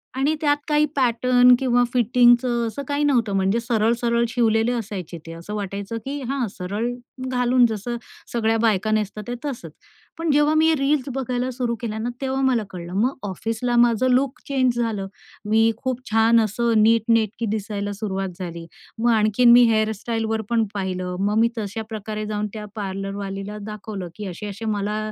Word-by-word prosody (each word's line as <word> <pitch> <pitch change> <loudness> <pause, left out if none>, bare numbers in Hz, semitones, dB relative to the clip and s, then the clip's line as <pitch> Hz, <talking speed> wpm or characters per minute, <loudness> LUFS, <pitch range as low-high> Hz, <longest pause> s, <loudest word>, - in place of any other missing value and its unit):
आणि 285 +4 +1
त्यात 290 -1 +3
काही 300 0 +3
पॅटर्न 250 0 +4
किंवा 245 -2 +3
फिटिंगचं 240 0 +4
असं 280 +5 -5
काही 290 +1 0
नव्हतं. 235 -8 +2
म्हणजे 195 +4 +2
सरळ 230 -1 +1
सरळ 235 0 +2
शिवलेले 225 -1 +2
असायचे 200 -7 -5
ते 165 - -8
असं 170 +5 -8
वाटायचं 200 +2 -4
की 280 +1 -4
हा 270 -3 0
सरळ 205 +6 -2 0.4
घालून 250 0 +3
जसं 225 +3 -4 0.4
सगळ्या 225 -1 +1
बायका 215 -2 +2
नेसतात 215 0 -1
ते 245 - -3
तसंच. 275 -5 -5 0.5
पण 330 -2 0
जेव्हा 295 +1 +3
मी 315 +1 +4
हे 325 - +4
रील्स 280 -1 0
बघायला 255 -1 -2
सुरू 245 -2 -2
केल्या 220 -2 -3
ना 235 - -2
तेव्हा 265 0 -1
मला 255 -5 +2
कळलं, 175 -1 -8
मग 260 +3 0
ऑफिसला 225 +5 -2
माझं 235 +1 +4
लूक 265 +3 +1
चेंज 255 -3 +1
झालं 215 -4 -1 0.4
मी 225 +1 +4
खूप 255 +1 -3
छान 225 +1 +5
असं 220 +1 +1
नीटनेटकी 230 0 +2
दिसायला 205 -1 -3
सुरुवात 195 -2 -3
झाली 170 -2 -6 0.3
मग 235 +2 +1
आणखीन 215 +3 +4
मी 245 +1 +8
हेअरस्टाइलवर 220 +1 -1
पण 230 -1 +2
पाहिलं 185 -2 -3
मग 210 +1 +1
मी 230 +1 +4
तश्या 215 0 -4
प्रकारे 215 -1 -5
जाऊन 210 0 -2
त्या 215 -1 -6
पार्लरवालीला 195 0 -5
दाखवलं 210 -4 -6
की 210 - -6
असे-असे 205 +4 -6
मला 210 +1 -2
225 Hz, 165 wpm, -22 LUFS, 210-245 Hz, 0.5 s, मी